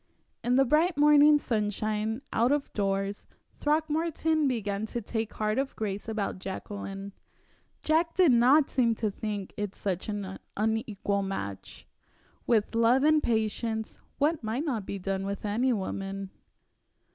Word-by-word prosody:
In 245 Hz, +2 st, +2 dB
the 270 Hz, +1 st, +5 dB
bright 320 Hz, +6 st, +2 dB
morning 295 Hz, 0 st, +7 dB
sunshine 215 Hz, 0 st, -1 dB
out 235 Hz, +3 st, +3 dB
of 290 Hz, -1 st, -1 dB
doors 195 Hz, 0 st, -1 dB, 0.3 s
Throckmorton 315 Hz, 0 st, +1 dB
began 215 Hz, -4 st, -2 dB
to 240 Hz, -, -3 dB
take 220 Hz, 0 st, -3 dB
heart 215 Hz, +2 st, 0 dB
of 270 Hz, 0 st, -2 dB
grace 205 Hz, 0 st, -4 dB
about 210 Hz, -4 st, -2 dB
Jacqueline. 195 Hz, +1 st, -6 dB, 0.7 s
Jack 330 Hz, +2 st, +2 dB
did 360 Hz, -6 st, +5 dB
not 255 Hz, +5 st, +5 dB
seem 235 Hz, -3 st, +2 dB
to 215 Hz, -2 st, -1 dB
think 205 Hz, -2 st, -5 dB
it 205 Hz, -2 st, -3 dB
such 190 Hz, 0 st, -3 dB
an 200 Hz, -2 st, -4 dB, 0.2 s
unequal 215 Hz, -2 st, 0 dB
match. 190 Hz, -, -6 dB, 0.6 s
With 220 Hz, -2 st, +2 dB
love 230 Hz, +4 st, +4 dB
and 310 Hz, 0 st, +5 dB
patience 220 Hz, -1 st, -1 dB, 0.2 s
what 300 Hz, -1 st, +1 dB
might 230 Hz, +8 st, -2 dB
not 230 Hz, -10 st, -2 dB
be 200 Hz, -, -3 dB
done 195 Hz, 0 st, -2 dB
with 200 Hz, +1 st, -4 dB
any 235 Hz, +6 st, +1 dB
woman? 195 Hz, -2 st, -3 dB
220 Hz, 140 wpm, -28 LUFS, 200-275 Hz, 0.7 s, morning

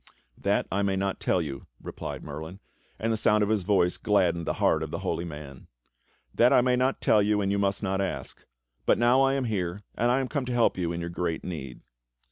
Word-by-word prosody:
^" -, -, -43 dB, 0.4 s
"That -, -, +2 dB
I 100 Hz, -, +1 dB
may 100 Hz, -1 st, +1 dB
not 95 Hz, 0 st, -1 dB
tell 90 Hz, -, +1 dB
you," 70 Hz, -4 st, -7 dB
replied -, -, -7 dB
Merlin, 80 Hz, +6 st, -7 dB, 0.4 s
and 115 Hz, +1 st, 0 dB
the -, -, 0 dB
sound 105 Hz, 0 st, +3 dB
of 105 Hz, -, 0 dB
his 110 Hz, -2 st, +2 dB
voice 90 Hz, -2 st, +2 dB
gladdened 85 Hz, -5 st, +1 dB
the -, -, +1 dB
heart -, -, +2 dB
of -, -, -3 dB
the -, -, -4 dB
Holy 85 Hz, -, -1 dB
Man. 75 Hz, -5 st, -9 dB, 0.7 s
"That 120 Hz, +1 st, +4 dB
I -, -, +6 dB
may 125 Hz, 0 st, +2 dB
not 130 Hz, +2 st, 0 dB
tell 105 Hz, -, +4 dB
you, 105 Hz, +1 st, +2 dB
and 100 Hz, -1 st, 0 dB
you 100 Hz, -, +1 dB
must 100 Hz, +1 st, 0 dB
not 95 Hz, 0 st, 0 dB
ask; 95 Hz, -, -5 dB, 0.4 s
but -, -, +5 dB
now 120 Hz, +3 st, +4 dB
I 135 Hz, 0 st, +3 dB
am 135 Hz, -, 0 dB
here, 100 Hz, -3 st, -2 dB
and 120 Hz, +2 st, +1 dB
I 125 Hz, +2 st, +3 dB
am 135 Hz, -, -1 dB
come 140 Hz, -1 st, -2 dB
to 125 Hz, -, -3 dB
help 120 Hz, -1 st, +3 dB
you 85 Hz, -2 st, -2 dB
in 85 Hz, 0 st, -4 dB
your 85 Hz, 0 st, -4 dB
great 85 Hz, -2 st, -2 dB
need." 70 Hz, -8 st, -6 dB
100 Hz, 240 wpm, -27 LUFS, 85-115 Hz, 0.7 s, I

